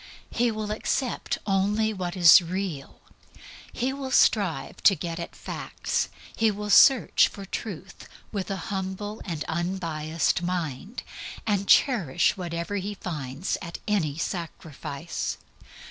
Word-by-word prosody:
He 240 0 +2
will 215 -1 -3
accept 240 +3 -1
only 210 +2 +1
what 180 -2 -4
is 175 0 +9
real; 175 -5 -5 0.7
he 255 +2 -1
will 270 -1 -5
strive 190 - +2
to 195 - +6
get 170 +1 -5
at 170 - -6
facts; - - -3 0.3
he 225 -1 +3
will 210 0 -3
search 260 +3 +6
for 200 - -9
Truth 195 -2 -7 0.2
with 200 -2 -3
a 195 - -1 0.2
humble 195 +3 -4
and 165 -5 -3
unbiased 165 -2 -1
mind, 175 - -3 0.4
and 200 -3 0
cherish 210 - +4
whatever 170 +1 -3
he 200 +2 -4
finds 150 -3 -4
at 170 -2 -6
any 165 -9 0
sacrifice. 165 -2 -4
190 Hz, 125 wpm, -26 LUFS, 170-210 Hz, 0.7 s, is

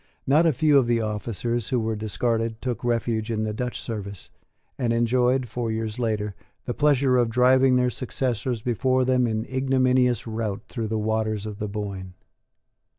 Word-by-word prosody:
Not 155 +5 +4
a - - +5
few 145 +1 +4
of 125 - 0
the 120 -1 +2
officers 110 +2 -2
who 125 - +1
were 110 0 -1
discarded 115 +1 -1
took 125 -3 -4
refuge 115 -2 -1
in 110 -1 -1
the 110 -1 -2
Dutch 125 +3 -3
service, 100 -4 -6 0.4
and 120 -3 -1
enjoyed, 125 +2 +2
four 115 0 -3
years 110 +1 -3
later, 105 -3 -1 0.3
the 120 - -2
pleasure 140 -3 +3
of 120 -2 +2
driving 130 +2 +4
their 125 0 +2
successors 125 -2 -2
before 130 +2 +1
them 125 -1 +2
in 110 -1 -2
ignominious 130 -2 +2
rout 110 -3 -3
through 115 -4 -4
the 110 +1 -2
waters 110 -1 -1
of 105 -2 -6
the 105 - -2
Boyne. 100 -3 -6
115 Hz, 170 wpm, -24 LUFS, 110-125 Hz, 0.4 s, a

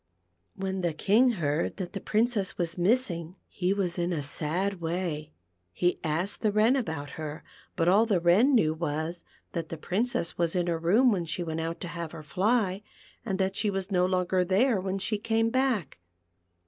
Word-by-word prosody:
When 190 -1 -3
the 170 -2 0
King 230 +9 +4
heard 155 -5 -1
that 185 -3 -5
the 195 - -4
Princess 220 -3 0
was 170 -1 -2
missing 180 -4 0
he 180 -1 -1
was 190 -3 -1
in 175 +1 0
a 155 -4 -2
sad 175 +7 -2
way. 165 -3 -3 0.4
He 175 - 0
asked 170 +5 -1
the 215 - +2
Wren 215 +5 +4
about 160 - -3
her, 150 0 -6 0.3
but 165 - +1
all 205 +5 +5
the 200 -5 +2
Wren 200 +11 +4
knew 155 -9 +3
was, 160 +1 -3 0.3
that 165 -2 -4
the 165 - -5
Princess 215 - -1
was 170 +1 +2
in 175 -1 +1
her 170 -2 -1
room 215 +10 +4
when 180 -5 0
she 170 +2 -2
went 160 -1 -3
out 165 +1 -3
to 180 - -4
have 170 -1 -6
her 160 -2 -8
fly, 195 +3 +1 0.4
and 195 -5 -2
that 190 0 0
she 210 - 0
was 195 0 -3
no 180 -1 +3
longer 185 0 +1
there 195 +4 +2
when 190 +1 -2
she 210 +2 -1
came 225 +1 +1
back. 255 - 0
185 Hz, 190 wpm, -28 LUFS, 165-205 Hz, 0.4 s, all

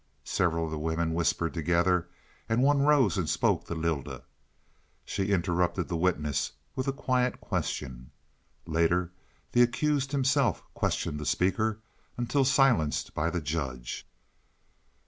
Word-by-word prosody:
Several 85 -2 +1
of 80 - -5
the 80 - -3
women 80 +1 -1
whispered 85 0 0
together, 85 +2 +1 0.4
and 115 +3 +2
one 145 +1 +4
rose 140 - +4
and 80 -4 -1
spoke - - +1
to 85 - -4
Lylda. 80 -6 -3 0.8
She 95 - -2
interrupted 90 -1 0
the 85 - -1
witness 80 -5 0 0.2
with 130 0 -2
a - - +2
quiet 130 -2 0
question. 65 -1 -4 0.6
Later 85 +2 +1 0.4
the 120 - +4
accused 135 +3 +1
himself 135 - +2
questioned 75 - -1
the 75 - -5
speaker 110 +4 +1 0.4
until 120 +3 +1
silenced 130 - +2
by 80 +2 0
the 90 -1 -2
judge. 70 -6 -4
90 Hz, 130 wpm, -29 LUFS, 80-120 Hz, 0.8 s, one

